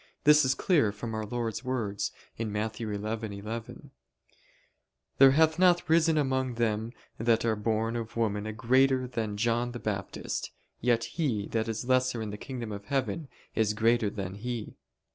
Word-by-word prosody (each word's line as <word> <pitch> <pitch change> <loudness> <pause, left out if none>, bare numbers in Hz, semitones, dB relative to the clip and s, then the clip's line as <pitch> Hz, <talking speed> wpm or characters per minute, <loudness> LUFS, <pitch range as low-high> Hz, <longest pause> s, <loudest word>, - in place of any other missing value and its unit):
This 150 0 +7
is 130 0 +2
clear 150 - +3
from 110 +2 -6
Our 110 -1 -3
Lord's 115 0 -3
words 115 -6 -2 0.3
(Matt. 110 0 -2
11:11): 110 0 -5 1.3
"There 135 0 +10
hath 160 +2 +3
not 180 -1 +4
risen 160 0 +4
among 130 -3 0
them 110 -1 0 0.3
that 115 0 +2
are 110 -1 +2
born 110 +2 -1
of 115 -1 -5
woman 105 -2 0
a - - -2
greater 130 +3 +3
than 110 -4 -3
John 120 +2 0
the 120 - -5
Baptist; 100 -4 -3 0.3
yet 120 -1 +2
he 130 - -1
that 110 -1 -1
is 115 +1 -3
lesser 130 -1 +2
in 110 -2 -4
the 105 - -6
kingdom 120 -1 -6
of 100 0 -7
heaven 140 +4 -1 0.3
is 110 -1 +1
greater 115 0 +3
than 95 -2 -5
he." 115 +2 -5
115 Hz, 160 wpm, -29 LUFS, 110-130 Hz, 1.3 s, There